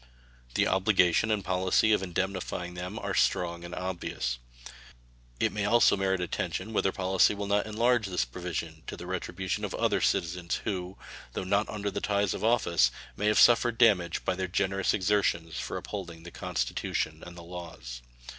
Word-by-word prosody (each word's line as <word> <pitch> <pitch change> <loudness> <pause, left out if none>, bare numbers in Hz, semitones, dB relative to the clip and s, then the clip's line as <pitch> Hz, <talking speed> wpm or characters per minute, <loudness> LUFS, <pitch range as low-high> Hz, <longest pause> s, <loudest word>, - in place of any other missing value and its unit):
The - - +3
obligation 95 +1 +3
and 105 -3 0
policy 95 +4 +2
of 105 - +2
indemnifying 90 -1 -3
them 90 +4 -6
are - - -3
strong 85 -1 +1
and 85 +1 -7
obvious. 85 -10 -3 1.0
It - - +2
may 105 - -2
also 120 +1 +5
merit 95 -1 0
attention 110 +5 -3
whether 95 - +2
policy 95 +2 +3
will 100 0 -4
not 100 +1 +1
enlarge 115 0 +2
this 90 -9 0
provision 80 +3 -5
to - - -6
the - - -8
retribution 95 0 -3
of - - -3
other - - +1
citizens 85 +1 0
who, 95 -3 -3 0.4
though - - -3
not 100 +3 +1
under 100 -1 -3
the - - -4
ties 100 -2 +1
of - - -5
office, 85 - +3 0.3
may 105 - -1
have 105 - +3
suffered 120 -1 +5
damage 95 -8 +3
by - - +1
their 95 0 -2
generous 95 +1 +1
exertions 90 -4 0
for - - -4
upholding 85 -5 -7
the 85 - -9
Constitution 75 +5 -2
and 85 0 -10
the 85 - -9
laws. 85 -9 -8
95 Hz, 170 wpm, -29 LUFS, 85-100 Hz, 1.0 s, also